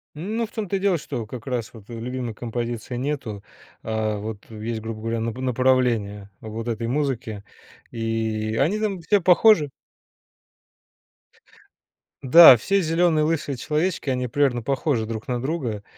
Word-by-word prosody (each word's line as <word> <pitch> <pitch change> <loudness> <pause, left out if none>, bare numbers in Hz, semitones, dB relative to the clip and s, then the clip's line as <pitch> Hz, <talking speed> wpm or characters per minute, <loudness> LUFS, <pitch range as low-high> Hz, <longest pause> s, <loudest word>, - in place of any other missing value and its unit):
Ну, 215 +8 -3
в - - -23
том-то 205 -3 -2
и - - -4
дело, 190 -3 +2
что 120 -7 -5
как 120 -1 -8
раз 125 -4 -3
вот 110 -3 -14
любимой 120 0 -5
композиции 120 +1 -4
нету. 125 -7 -4 0.4
А, 110 -1 -1
вот 105 +1 -7
есть, 110 +1 -5
грубо 110 -1 -6
говоря, 115 0 -2
нап 115 +1 -3
направление 125 -6 0
вот 110 +2 -6
этой 115 0 -2
музыки. 125 -6 -2 0.5
И 110 -1 -2
они 180 +10 +2
там 200 -5 -2
все 200 +3 +2
похожи. 180 -3 +5 2.5
Да, 135 -1 +10
все 195 - +1
зелёные 165 -1 +2
лысые 150 -3 -1
человечки, 150 +3 -1
они 125 -1 -1
примерно 125 -1 +1
похожи 135 -2 0
друг 110 +2 -6
на 120 -1 -1
друга. 130 -9 -3
125 Hz, 145 wpm, -23 LUFS, 110-150 Hz, 2.5 s, Да